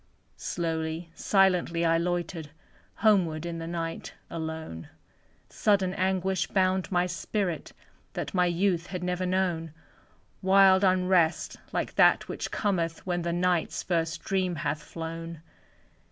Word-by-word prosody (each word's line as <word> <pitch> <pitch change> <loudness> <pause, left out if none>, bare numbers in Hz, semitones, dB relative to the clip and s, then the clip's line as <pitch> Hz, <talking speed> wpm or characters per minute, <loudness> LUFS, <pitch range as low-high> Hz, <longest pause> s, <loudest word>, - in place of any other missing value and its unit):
Slowly, 165 0 -3
silently 180 -4 +2
I 165 0 +3
loitered, 170 -2 -2 0.6
Homeward, 170 -7 +3
in 170 -1 -4
the 165 - -5
night, 165 -1 -4 0.2
alone; 160 - -5 0.6
Sudden 195 -3 +1
anguish 190 -1 0
bound 185 -1 +1
my 180 -1 +2
spirit, 180 -1 -3 0.4
That - - -4
my 180 -1 +3
youth 175 0 +1
had 180 -1 -5
never 180 0 -1
known; 175 -4 0 0.7
Wild 190 0 +6
unrest, 185 -3 +2
like - - -2
that - - +5
which - - -4
cometh 170 -6 -1
When 175 -1 -1
the 170 0 -1
Night's 175 -1 0
first 165 -2 -1
dream 185 -2 0
hath 150 0 -2
flown. 165 +1 -7
175 Hz, 125 wpm, -28 LUFS, 165-185 Hz, 0.7 s, Wild